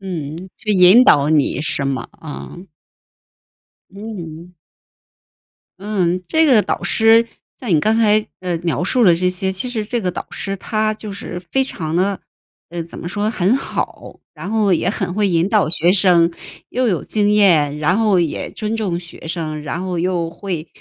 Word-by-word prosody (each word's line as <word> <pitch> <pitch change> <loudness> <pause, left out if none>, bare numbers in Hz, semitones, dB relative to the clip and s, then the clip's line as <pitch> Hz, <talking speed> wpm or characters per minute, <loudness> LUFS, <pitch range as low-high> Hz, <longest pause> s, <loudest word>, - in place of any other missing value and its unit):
嗯， 165 -6 -5 0.2
去 215 - -4
引 190 +6 +7
导 145 - +5
你 150 -3 +2
是 145 -2 -1
吗？ 135 -3 -3
啊。 155 +1 -9 1.3
嗯。 180 -5 -9 1.3
嗯， 185 -3 -1
这 320 0 +3
个 240 -8 +5
导 - - -3
师， 225 +1 +4 0.3
像 250 - -7
你 165 -5 +3
刚 215 +7 +2
才， 215 -1 +3
呃， 180 -2 -2
描 170 0 -1
述 245 +7 +1
了 180 -6 +6
这 180 +2 0
些， 185 +1 -1
其 190 +7 -3
实 225 -4 -3
这 240 +2 -2
个 185 -3 -1
导 - - -6
师 195 0 -4
他 215 +2 -1
就 215 -1 -8
是 180 -2 -7
非 270 - +3
常 160 -11 -4
地 190 +3 +1 0.5
呃， 170 0 -4
怎 165 - -11
么 170 - -6
说， 205 +4 -1
很 200 0 +1
好， - - -5
然 165 +5 -8
后 215 -3 +2
也 175 - +1
很 195 -3 -2
会 205 0 +1
引 170 +1 +1
导 210 -6 +2
学 170 +2 +2
生， 175 -3 +4 0.4
又 255 0 0
有 180 -7 -1
经 205 -1 +1
验， 165 -9 +4
然 155 +5 +1
后 210 -4 +3
也 170 -3 -2
尊 215 0 -4
重 195 -6 -2
学 170 -1 -11
生， 155 -3 -4
然 170 +4 -4
后 180 -2 -3
又 175 -1 -1
会 170 -2 -5
185 Hz, 190 characters per minute, -18 LUFS, 170-215 Hz, 1.3 s, 引